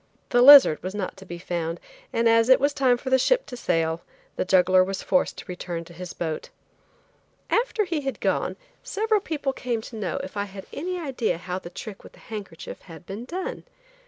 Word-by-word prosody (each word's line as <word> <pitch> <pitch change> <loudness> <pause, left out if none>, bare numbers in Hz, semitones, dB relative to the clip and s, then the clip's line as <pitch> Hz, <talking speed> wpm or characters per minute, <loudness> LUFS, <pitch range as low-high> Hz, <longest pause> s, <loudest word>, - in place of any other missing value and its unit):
The 245 - +4
lizard 270 - +9
was 185 +2 -5
not 195 -3 -3
to 190 0 -13
be 175 - -6
found, 170 -1 -3 0.3
and 230 0 +2
as 230 +1 +4
it 260 - +7
was 285 +1 +2
time 255 -3 +3
for 260 +2 -6
the 260 - +5
ship - - +2
to 250 - -8
sail, 165 -7 0 0.3
the - - 0
juggler 185 0 +5
was 190 +1 -4
forced 185 - +1
to - - -8
return 175 -2 -5
to 170 - -14
his 180 +1 -7
boat. 160 -2 -4 1.0
After 460 -2 +2
he 335 -4 -2
had 270 -1 -4
gone, - - 0 0.3
several 430 0 0
people 290 -6 -2
came 245 -3 -2
to 225 - -10
know 215 -3 -3
if 190 - -8
I 200 0 -1
had 195 -1 -10
any 360 +4 -3
idea 255 - -1
how 180 +1 -4
the 170 - -9
trick 195 +3 -9
with - - -14
the - - -18
handkerchief 195 -6 -7
had 165 -1 -13
been 205 +6 -7
done. 375 - -5
210 Hz, 210 wpm, -25 LUFS, 180-270 Hz, 1.0 s, lizard